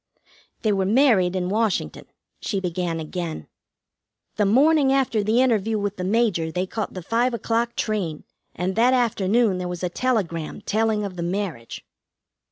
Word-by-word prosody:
"They 215 - +2
were 190 -1 0
married 210 -6 +3
in 180 -1 -1
Washington," 205 - -1 0.3
she 195 - -2
began 175 -2 -2
again. 160 - -5 0.9
"The 210 -2 +2
morning 280 +5 +4
after 265 -5 +2
the 220 +5 +3
interview 225 -3 +1
with 205 -1 -3
the 180 - -4
Major 190 -5 +1
they 180 +2 -1
caught 210 +2 -5
the 185 - -6
five 235 +5 +1
o'clock 235 +1 -1
train, 190 -8 -2 0.3
and 185 +2 -2
that 245 +3 +4
afternoon 220 -3 +2
there 180 - -3
was 180 0 -6
a 180 - 0
telegram 180 -8 -2
telling 215 0 0
of 185 -2 -7
the - - -3
marriage. 175 - -4
205 Hz, 160 wpm, -23 LUFS, 180-230 Hz, 0.9 s, morning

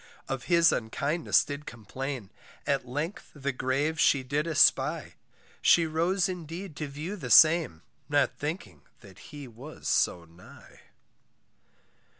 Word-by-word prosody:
Of 135 -2 -4
his 170 -1 +4
unkindness 145 +8 +1
did 145 0 -7
complain; 125 0 -6 0.3
At - - -1
length 150 +9 -5
the 140 -1 -2
grave 135 +5 -1
she 135 -2 +3
did 145 +5 -2
espy, 160 -3 +2 0.5
She 170 - +5
rose 170 +4 0
indeed 175 -1 -7
to 155 - -4
view 150 +8 -6
the 145 -11 -7
same, 155 - +5 0.3
Not 145 -1 +2
thinking 145 - -6 0.2
that 95 -2 -15
he 145 -3 -9
was 125 +7 -10
so 85 -2 +1
nigh. 85 +2 -17
145 Hz, 130 wpm, -28 LUFS, 130-165 Hz, 0.5 s, She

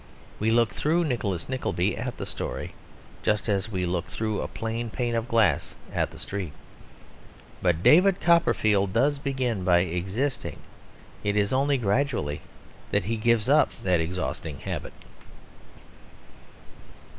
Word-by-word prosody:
We 110 - +1
look 115 0 +3
through 165 +4 +1
Nicholas 105 - -2
Nickleby 105 -7 -1
at 120 +1 -4
the - - -4
story - - -5 0.5
just 105 0 0
as 100 0 0
we 90 -2 -1
look 90 0 -1
through 110 -2 -2
a - - -3
plain 115 +1 -4
pane 120 +1 -2
of 115 0 -1
glass 115 -3 +2 0.2
at - - 0
the - - -13
street. 95 -7 -5 1.1
But 90 -2 +1
David 185 +4 +6
Copperfield 110 - +3
does 145 +4 +2
begin 130 -8 -1
by 90 -1 +4
existing; 95 - -2 0.7
it 105 0 0
is 105 +3 +2
only 140 +1 +2
gradually 110 - 0 0.5
that - - +1
he 115 +3 0
gives 115 0 +2
up 150 +3 +5
that 90 -3 +2
exhausting 80 -3 -4
habit. - - -5
110 Hz, 135 wpm, -26 LUFS, 95-130 Hz, 1.1 s, David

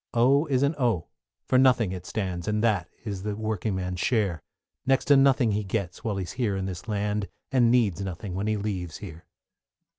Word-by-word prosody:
=O= 135 +6 +4
is 135 -2 +2
an 140 +2 +2
O, 115 - +1 0.4
for 130 - +3
nothing 125 -6 +4
it 90 -1 -6
stands, 90 -4 -3
And 105 +1 0
that 100 -6 +1 0.2
is 100 -4 -4
the 105 +1 -3
working 110 -2 -2
man's 90 -1 -3
share; 100 - +1 0.4
Next 135 0 +2
to 145 - +6
nothing 135 -4 +4
he 105 +1 0
gets 95 -3 -3
while 105 -3 -1
he 95 - -1
is 90 - -7
here 110 -4 -1
in 95 - -2
this 95 +2 -6
land, 105 -1 -1 0.2
And 125 -3 +4
needs 115 -7 +2
nothing 95 0 -5
when 100 +3 -2
he 110 0 +1
leaves 95 -5 -4
here. 85 -5 -10
105 Hz, 205 wpm, -26 LUFS, 95-120 Hz, 0.4 s, to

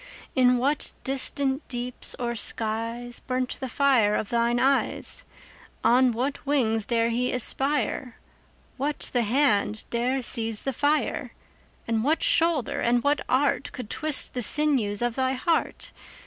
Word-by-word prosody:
In 250 -2 +4
what 280 +4 0
distant 270 +1 -1
deeps 245 0 -4
or 240 -1 -2
skies 230 +2 -2
5 - - -31
Burnt 255 -1 -2
the 260 - -4
fire 250 -6 +3
of 205 - -2
thine 235 0 +1
eyes? 270 +2 0 0.6
On 255 +1 +4
what 260 +5 -3
wings 225 -7 +1
dare 230 -1 +1
he 250 +2 0
aspire? 255 0 -1 0.6
What 290 +3 -2
the 245 - +2
hand 220 -3 +1
dare 250 +3 0
seize 225 -3 0
the 270 - -2
fire? 290 +5 0 0.5
And 225 -1 0
what 310 +5 +1
shoulder 325 -7 +2
and 240 0 +2
what 290 +1 +2
art 275 +2 +1
Could 250 -4 -7
twist 310 -2 +1
the 250 - -2
sinews 240 -5 +2
of 240 -1 0
thy 260 +1 0
heart? 320 +5 -1
250 Hz, 145 wpm, -26 LUFS, 235-275 Hz, 0.6 s, In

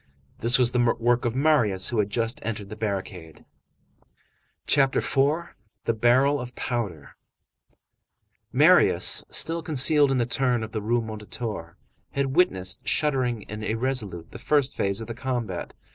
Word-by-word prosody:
This 120 +2 +4
was 125 -2 +2
the 125 - 0 0.2
work 120 +1 +1
of 120 0 -1
Marius, 130 -10 +2
who 115 - -1
had 105 -1 +1
just 115 +5 -2
entered 105 -5 -5
the 105 - -7
barricade. 95 -6 -5 1.2
CHAPTER 135 -2 +3
IV—THE 135 -6 -1
BARREL 130 +5 +3
OF 125 0 -9
POWDER 105 - -4 1.4
Marius, - - +4
still 165 +1 -2
concealed 150 -1 +4
in 135 - +1
the 120 - +1
turn 125 -1 0
of 110 - -7
the 110 - -3
Rue 115 +3 0
Mondétour, 105 -5 -6 0.4
had 135 -1 -1
witnessed, 95 - 0
shuddering 130 -7 0
and 105 +1 -7
irresolute, 110 -7 -3
the - - -10
first 145 -2 +1
phase 100 +2 -1
of 110 - -7
the 115 - -5
combat. 120 -7 -4
120 Hz, 145 wpm, -25 LUFS, 105-135 Hz, 1.4 s, This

